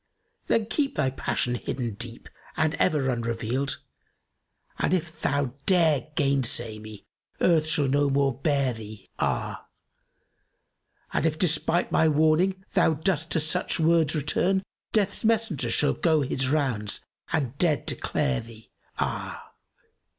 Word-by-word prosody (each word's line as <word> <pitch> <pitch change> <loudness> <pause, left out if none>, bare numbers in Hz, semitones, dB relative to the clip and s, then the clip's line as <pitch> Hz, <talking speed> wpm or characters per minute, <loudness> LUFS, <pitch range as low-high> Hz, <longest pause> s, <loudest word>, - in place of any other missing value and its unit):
Then 225 -2 +2
keep 280 +5 -1
thy 135 -3 +1
passion 125 -1 -1
hidden 120 -1 -3
deep 115 +2 -6 0.3
and 155 0 +2
ever 135 -4 +2
unrevealed, 120 +3 -2 0.5
* - - -34
And 185 - +2
if 165 -2 -5
thou 140 -3 0
dare 165 -7 +3
gainsay 125 -6 +2
me 110 -1 -11 0.3
Earth 160 -3 +3
shall 150 -2 +1
no 140 +1 +2
more 140 -1 +2
bear 140 -1 0
thee, 110 -3 -11
ah! - - -2 1.5
And - - +1
if, 155 -1 -2
despite 165 0 +1
my 160 - +4
warning, 160 +5 +2
thou 170 -4 +3
dost 160 0 0
to - - +3
such 160 +4 +1
words 160 -1 +3
return, 180 +6 +1
* - - -68
Death's 205 -2 0
Messenger[FN#275] 220 - +1
shall 150 - +2
go 160 -3 +2
his 130 -1 0
rounds 130 -9 0 0.3
and 140 -5 -1
dead 160 -5 +2
declare 65 -2 0
thee, 115 -1 -14 0.3
ah! - - -4
145 Hz, 135 wpm, -26 LUFS, 125-165 Hz, 1.5 s, my